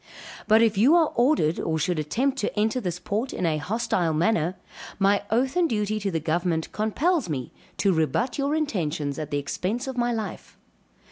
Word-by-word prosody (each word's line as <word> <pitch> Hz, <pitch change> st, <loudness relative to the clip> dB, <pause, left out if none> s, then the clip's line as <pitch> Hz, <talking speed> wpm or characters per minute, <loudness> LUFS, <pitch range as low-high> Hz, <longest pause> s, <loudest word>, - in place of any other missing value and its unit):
But 220 Hz, +1 st, +6 dB
if 215 Hz, -3 st, +2 dB
you 270 Hz, +10 st, +6 dB
are 330 Hz, -3 st, +4 dB
ordered, 240 Hz, -, +2 dB
or 160 Hz, -1 st, -1 dB
should 165 Hz, +1 st, 0 dB
attempt 255 Hz, -, 0 dB
to 210 Hz, -, -2 dB
enter 220 Hz, +4 st, +1 dB
this 175 Hz, -4 st, -3 dB
port 210 Hz, +8 st, -3 dB
in 180 Hz, -, -2 dB
a 155 Hz, -2 st, +1 dB
hostile 180 Hz, -3 st, 0 dB
manner, 170 Hz, 0 st, +1 dB, 0.4 s
my 200 Hz, +1 st, +3 dB
oath 255 Hz, +6 st, +1 dB
and 350 Hz, -2 st, +2 dB
duty 215 Hz, -1 st, -1 dB
to 200 Hz, -1 st, -2 dB
the 165 Hz, -3 st, -1 dB
government 160 Hz, +1 st, -1 dB
compels 265 Hz, -, 0 dB
me 130 Hz, -5 st, -4 dB, 0.3 s
to 195 Hz, -2 st, +2 dB
rebut 200 Hz, -, 0 dB
your 280 Hz, +2 st, +1 dB
intentions 160 Hz, -, -2 dB
at 155 Hz, -1 st, -4 dB
the 145 Hz, -, -1 dB
expense 190 Hz, -, -2 dB
of 265 Hz, -1 st, -5 dB
my 240 Hz, 0 st, +1 dB
life. 220 Hz, -2 st, -5 dB
210 Hz, 190 wpm, -25 LUFS, 160-245 Hz, 0.4 s, But